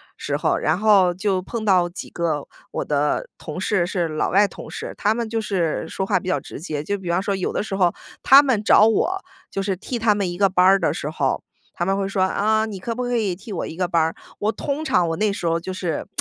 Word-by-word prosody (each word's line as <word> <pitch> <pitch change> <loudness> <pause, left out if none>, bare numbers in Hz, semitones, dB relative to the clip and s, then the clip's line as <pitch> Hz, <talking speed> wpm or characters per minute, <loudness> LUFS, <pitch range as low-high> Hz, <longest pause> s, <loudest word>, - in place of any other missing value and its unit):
时 - - -3
候。 - - +1
然 155 +4 0
后 200 -4 +5
就 190 0 0
碰 220 +4 -5
到 180 -4 +3
几 175 - -8
个 160 -4 -2 0.2
我 - - -3
的 145 0 0
同 155 +3 -7
事 190 -1 +1
是 175 -2 -1
老 155 -1 -1
外 200 +2 +4
同 - - -10
事， - - -6
他 210 - +2
们 235 0 -3
就 225 0 -1
是 180 -8 -1
说 190 - -2
话 - - +2
比 185 - -4
较 185 - +1
直 - - -10
接， 155 -4 -3
就 200 +7 -2
比 185 -3 -7
方 175 +2 +1
说 200 0 -1
有 190 - -2
的 - - -1
时 200 -2 -4
候 180 -3 +3 0.3
他 275 +1 +9
们 255 -7 0
找 210 - +6
我， 365 - +1 0.3
就 195 - -2
是 195 -1 -1
替 235 +6 -5
他 220 -2 +3
们 200 -3 -1
一 175 - -6
个 200 +1 +4
班 180 0 +3
儿 195 +1 +7
的 170 - +1
时 - - -4
候， - - -1 0.3
他 175 - -2
们 195 +1 +1
会 200 - -1
说： 195 -1 -1
“啊， 220 +3 +1
你 210 -3 -6
可 230 +5 -3
不 250 +2 -3
可 245 0 -1
以 210 -5 0
替 200 +4 -9
我 180 - -3
一 160 - -8
个 180 -1 0
班 170 -2 +2
儿？” 160 +1 0 0.3
我 210 +1 +1
通 280 +7 -3
常 180 - +2
我 165 - -1
那 210 +3 +1
时 200 - -5
候 165 0 +1
就 180 +3 -6
是， 180 -4 -3
190 Hz, 285 characters per minute, -22 LUFS, 175-215 Hz, 0.3 s, 他